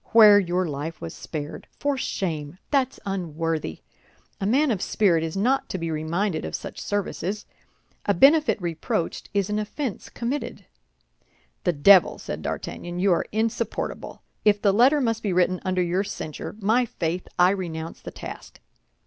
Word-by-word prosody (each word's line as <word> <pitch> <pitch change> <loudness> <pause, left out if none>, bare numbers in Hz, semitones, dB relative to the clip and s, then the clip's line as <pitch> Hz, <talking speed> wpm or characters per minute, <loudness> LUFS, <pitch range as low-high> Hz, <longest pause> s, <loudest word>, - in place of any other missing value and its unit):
Where 210 -3 +9
your 180 -1 0
life 155 +2 -5
was 165 - -6
spared! 150 -2 -6
For 285 -1 0
shame! 160 - -3
that's 270 -3 +1
unworthy. 165 - -3 0.6
A 195 - -1
man 270 +5 +3
of 200 -5 -1
spirit 175 -6 +2
is 165 +3 -3
not 255 +7 +1
to - - -2
be 165 -2 -3
reminded 160 +3 -1
of - - -4
such - - -7
services. 205 0 -2 0.6
A 205 - +3
benefit 290 - +5
reproached 170 -1 -3
is 200 -2 +1
an 210 - 0
offense 215 +2 -4
committed." 255 +5 -4 1.0
"The 175 - +3
devil!" 180 +5 +6
said - - -6
D'Artagnan, 175 0 -5
"you 195 +1 +3
are - - 0
insupportable. 225 +1 -2 0.2
If 205 -1 +4
the 200 -1 +3
letter 260 +7 +5
must 230 -3 0
be 200 -4 -1
written 180 0 +2
under 185 -1 +1
your 180 +3 0
censure, 155 -5 -6
my 220 +5 +3
faith, 175 -2 -3
I 180 +1 +6
renounce 165 -4 -4
the - - -7
task." - - -9
190 Hz, 155 wpm, -25 LUFS, 165-215 Hz, 1.0 s, Where